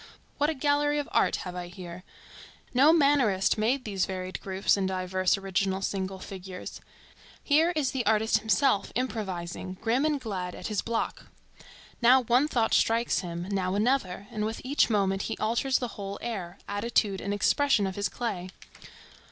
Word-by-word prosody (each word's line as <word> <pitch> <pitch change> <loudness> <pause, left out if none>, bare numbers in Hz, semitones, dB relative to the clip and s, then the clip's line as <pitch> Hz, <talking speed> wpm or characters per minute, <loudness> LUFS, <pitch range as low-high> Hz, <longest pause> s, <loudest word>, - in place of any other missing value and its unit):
What 295 +1 +3
a 320 - -1
gallery 290 +1 +1
of 290 - -2
art - - +3
have 180 -1 -6
I 180 -1 -5
here! 180 0 -9 0.7
No 275 +5 +6
mannerist 275 - +3
made 240 +5 0
these 195 -4 -1
varied 185 -1 -5
groups 190 0 +1
and 195 -2 0
diverse 185 0 0
original 195 0 -1
single 190 -1 -2
figures. 185 -1 -8 0.6
Here 315 +3 +4
is 280 -5 +1
the 260 -2 -1
artist 220 +1 +3
himself 220 -1 +2
improvising, 190 -7 -3
grim 235 +5 +1
and 305 -2 +1
glad, 190 -7 -4
at - - -6
his 210 -2 0
block. 230 -1 -3 0.7
Now 250 +2 +6
one 245 +5 +3
thought 235 -7 +1
strikes 230 +1 +2
him, 175 0 -5
now 190 -1 0
another, 205 -4 0
and 210 - -3
with 220 +1 -3
each 270 +1 +2
moment 195 -3 +1
he 225 - -3
alters 235 +4 +1
the 245 - -3
whole 200 -2 -6
air, 195 -7 -4
attitude 205 -1 0
and 200 - -3
expression 220 +2 +2
of 190 -1 -3
his 205 0 -1
clay. 195 -7 -4
210 Hz, 165 wpm, -28 LUFS, 190-250 Hz, 0.7 s, No